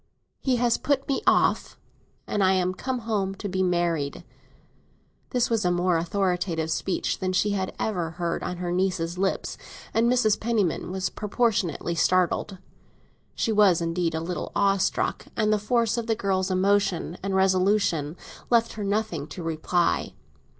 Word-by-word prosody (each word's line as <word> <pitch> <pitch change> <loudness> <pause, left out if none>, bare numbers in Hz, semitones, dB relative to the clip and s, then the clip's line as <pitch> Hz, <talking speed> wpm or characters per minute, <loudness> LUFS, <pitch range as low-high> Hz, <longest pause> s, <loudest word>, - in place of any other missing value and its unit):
He 260 -2 +1
has 240 -1 +2
put 280 -2 0
me 275 - 0
off. - - +2 0.5
I 190 -2 +2
am 185 -1 +1
come 255 +5 -3
home 195 -4 -1
to 205 - -5
be 190 0 -1
married." 175 -5 0 1.1
This 245 -1 0
was 225 -2 +1
a 180 - +2
more 175 0 +2
authoritative 175 -2 -1
speech 185 +4 -1
than 185 0 -1
she 205 +3 +2
had 190 -2 -2
ever 180 -7 -1
heard 170 -2 -2
on 180 - -4
her 175 0 -3
niece's 180 -1 -1
lips, 195 0 -1 0.3
and 235 +2 +3
Mrs. 220 -4 +3
Penniman 215 -9 0
was 190 0 -2
proportionately 205 - 0
startled. 185 +3 +1 0.8
She 225 - 0
was 205 -5 +5
indeed 165 0 -1
a 160 - -2
little 175 +2 -4
awestruck, 195 -1 +1
and 215 -1 +2
the 210 - +2
force 230 +2 +1
of 230 - -5
the 225 - +2
girl's 195 -3 0
emotion 190 -2 +1
and 195 0 -2
resolution 185 -4 +2 0.3
left 230 -1 +3
her 210 - -5
nothing 200 -7 -1
to 175 +3 -8
reply. 165 +2 0
190 Hz, 155 wpm, -25 LUFS, 175-215 Hz, 1.1 s, was